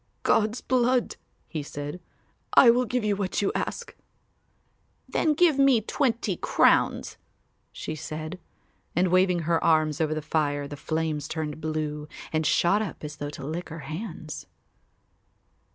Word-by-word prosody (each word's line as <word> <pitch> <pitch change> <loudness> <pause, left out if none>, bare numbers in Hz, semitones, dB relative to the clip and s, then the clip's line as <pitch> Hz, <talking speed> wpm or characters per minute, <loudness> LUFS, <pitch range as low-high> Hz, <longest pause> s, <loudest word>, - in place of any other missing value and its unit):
"God's 220 +2 +2
blood," 250 -1 +1 0.3
he 155 - -4
said, 145 +3 -6 0.6
"I 240 - +9
will 250 +1 +2
give 245 +1 -1
you 210 -1 +1
what 195 -2 -2
you 195 - +2
ask." - - -4 1.1
"Then 310 -2 +1
give 320 -4 +4
me 275 -4 +6
twenty 235 +2 0
crowns," - - +2 0.5
she - - -5
said, 155 +3 -6 0.6
and 180 +2 +3
waving 185 -1 +3
her 165 +1 +1
arms 155 -1 +3
over 155 -1 +1
the 155 - -2
fire 145 -2 0
the 145 - -7
flames 155 0 -2
turned 155 -1 -4
blue 155 -1 -3 0.3
and 155 -1 +1
shot 195 +5 +3
up 215 - -5
as 150 -1 -6
though 145 - -4
to 145 - -8
lick 165 +5 -4
her 165 0 -7
hands. 155 +1 -7
165 Hz, 145 wpm, -26 LUFS, 155-215 Hz, 1.1 s, I